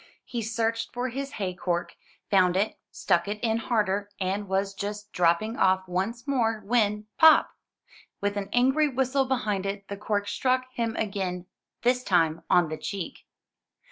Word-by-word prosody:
He 240 - -4
searched 225 +1 -1
for 250 +1 -1
his 275 +3 -5
hay 190 -6 -3
cork, 175 -1 -2 0.4
found 185 -2 +4
it, 205 +3 -1
stuck 170 +2 +1
it 205 +1 -2
in 225 -1 +2
harder, 205 -3 0
and 195 +2 -1
was 195 +1 0
just 210 +1 -5
dropping 180 +7 +2
off 190 0 +2
once 200 +8 -2
more, 225 -6 0
when, 210 -2 +1
pop! 320 -1 +7 0.7
with 205 0 -1
an 200 -1 -3
angry 265 +5 +3
whistle 265 0 +1
behind 220 -7 -1
it, 200 0 -5
the 200 - -4
cork 205 0 -1
struck 255 +2 +1
him 230 -2 -2
again, 190 -4 -2 0.4
this 250 +1 +2
time 165 -5 +2
on 175 -3 +4
the 155 - -4
cheek. 195 +3 -6
210 Hz, 160 wpm, -27 LUFS, 190-240 Hz, 0.7 s, pop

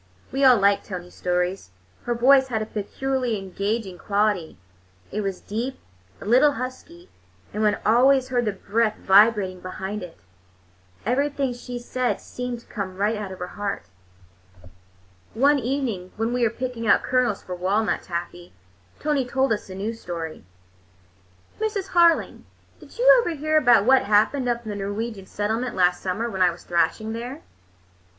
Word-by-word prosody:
We 270 +1 0
all 255 -2 +7
liked 200 0 +3
Tony's 180 -2 -7
stories. 180 - -2 0.4
Her 240 - 0
voice 265 +3 +5
had 230 -4 -1
a 215 - -3
peculiarly 245 +3 -2
engaging 195 0 -3
quality; 205 -5 0 0.5
it 215 - -2
was 195 -2 -4
deep, 240 +6 -4 0.4
a - - -10
little 260 +7 +5
husky, 270 +9 -8 0.4
and 210 - -2
one 210 -1 +2
always 255 +3 +4
heard 245 -2 +1
the 210 - +1
breath 215 +3 0
vibrating 195 -2 +4
behind 190 +3 -5
it. 180 -2 -9 0.9
Everything 275 +2 0
she 245 0 -7
said 245 +1 -2
seemed 250 -1 -6
to - - -24
come 190 -4 -6
right 210 +3 +1
out 210 -3 -5
of 190 - -8
her 180 0 -6
heart. 205 - -4 1.5
One 280 +4 +4
evening 240 -8 -3
when 225 +2 -1
we 250 - -1
were 230 - +4
picking 240 -1 -4
out - - +4
kernels 250 -5 +1
for 180 - -6
walnut 195 +4 0
taffy, 175 0 -6 0.5
Tony 295 -3 +1
told 265 0 +1
us 210 - -5
a 185 - -7
new 205 +4 -3
story. 170 -7 -6 1.2
"Mrs. 420 -3 -2
Harling, 340 -1 +3 0.3
did - - -15
you - - +7
ever 345 -8 -2
hear 310 +1 -1
about 240 -8 +5
what 265 +1 +5
happened 220 +6 +2
up 235 0 -1
in 220 - -7
the - - -4
Norwegian 205 0 -4
settlement 225 +4 -2
last 180 -1 +2
summer, 195 +5 -2
when 195 -5 -4
I 180 - +6
was 170 0 -8
thrashing 215 +5 0
there? 245 +6 -6
225 Hz, 160 wpm, -24 LUFS, 195-255 Hz, 1.5 s, all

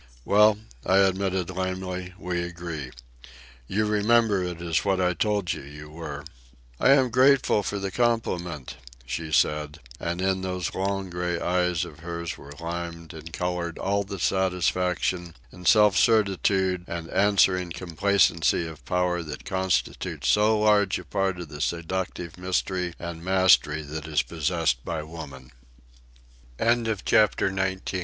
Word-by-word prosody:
"Well," 105 +1 +5 0.3
I 95 - +3
admitted 95 -1 +1
lamely, 95 0 -4
"we 90 -2 -3
agree. 85 -5 -6 0.8
You 110 +7 0
remember 105 -1 +3
it 90 -2 -4
is 85 -2 0
what 95 -1 +1
I 90 -1 +2
told 100 -2 0
you - - -7
you 75 +2 -11
were." 75 -3 -7 0.6
"I - - +4
am 130 -3 +3
grateful 130 -3 +4
for 100 +1 -3
the 100 -1 -3
compliment," 90 - -1 0.3
she 80 +5 -4
said; 75 +1 +1 0.2
and 85 +1 -3
in 95 0 0
those 90 -2 -3
long 95 -1 -2
gray 90 -1 -2
eyes 90 -1 0
of 75 -3 -12
hers 85 0 -5
were 70 - -13
limned 85 +1 -6
and 80 +1 -9
coloured 90 0 -3
all 100 +1 0
the 100 0 -7
satisfaction, 90 -1 0 0.2
and 90 -1 -8
self 105 -2 +6
certitude 95 -4 +2
and 85 -1 -5
answering 95 -2 +3
complacency 85 -1 +2
of 80 -2 -9
power 90 -1 0
that 75 -3 -8
constitute 95 -1 -1
so 105 +1 +4
large 105 -2 +3
a - - -9
part 95 -2 -1
of 85 -4 -7
the 75 0 -8
seductive 85 0 -3
mystery 90 -1 -1
and 85 -1 -7
mastery 90 -5 +3
that 75 +1 -6
is 75 -2 +1
possessed 80 -5 -1
by 80 -2 -3
woman. 75 -5 -10 1.1
CHAPTER 110 -3 +2
XX. 95 0 -2
90 Hz, 140 wpm, -26 LUFS, 85-95 Hz, 1.1 s, self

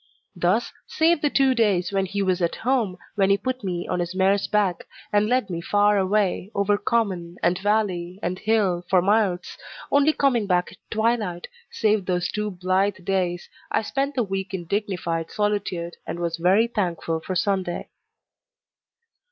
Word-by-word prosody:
Thus 180 +6 +1
save 325 0 +2
the 295 - +2
two 270 -2 +3
days 205 -6 +1
when 195 -1 0
he 200 +1 -1
was 185 -1 0
at 170 - 0
home, 235 -8 +1 0.2
when 195 -1 +2
he 200 - +4
put 255 +1 -3
me 175 -2 -3
on - - -1
his 175 +1 -3
mare's 195 +1 +2
back, 200 -5 0 0.3
and 205 0 +3
led 245 -6 +1
me 170 -1 -3
far 205 +2 +3
away, 195 0 +1
over 200 +1 +2
common, 185 -7 -1
and 180 +1 +2
valley, 190 -4 0
and 180 +2 -2
hill, 205 -5 +1
for 185 - +5
miles, 200 -3 +1 0.3
only 285 +2 +5
coming 250 -8 +1
back 180 -1 +1
at 185 - -16
twilight 220 -6 -1 0.2
save 210 -3 +1
those 180 -1 0
two 210 0 -2
blithe 185 +1 0
days, 180 -2 -1 0.2
I - - 0
spent 275 +5 -2
the 250 - +2
week 195 -1 -3
in 175 -2 -6
dignified 170 -4 -2
solitude, 200 -5 -2
and - - -4
was 170 -1 -2
very 185 +6 +4
thankful 175 -7 -2
for 185 +3 -5
Sunday. 185 -1 -1
195 Hz, 170 wpm, -24 LUFS, 180-215 Hz, 0.3 s, for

